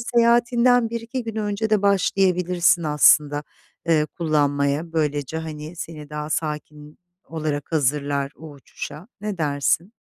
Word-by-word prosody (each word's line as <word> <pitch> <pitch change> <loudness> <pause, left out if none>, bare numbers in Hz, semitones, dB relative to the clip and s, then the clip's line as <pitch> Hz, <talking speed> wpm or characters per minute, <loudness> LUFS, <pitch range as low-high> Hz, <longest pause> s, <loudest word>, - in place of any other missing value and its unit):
seyahatinden 240 -1 +3
1-2 235 +2 -4
gün 225 -1 -6
önce 210 +1 -2
de 210 -2 +3
başlayabilirsin 180 -3 +2
aslında, 150 -1 +4 0.5
eee, 155 -2 +3
kullanmaya. 145 0 0
Böylece 150 -1 -1
hani, 155 +1 -7
seni 155 -3 -8
daha 150 0 -5
sakin 150 -1 -4 0.3
olarak 155 -1 -4
hazırlar 140 -1 0
o 160 0 -10
uçuşa, 150 - -9
ne 205 -3 -4
dersin? 150 +6 0
160 Hz, 120 wpm, -23 LUFS, 150-200 Hz, 0.5 s, aslında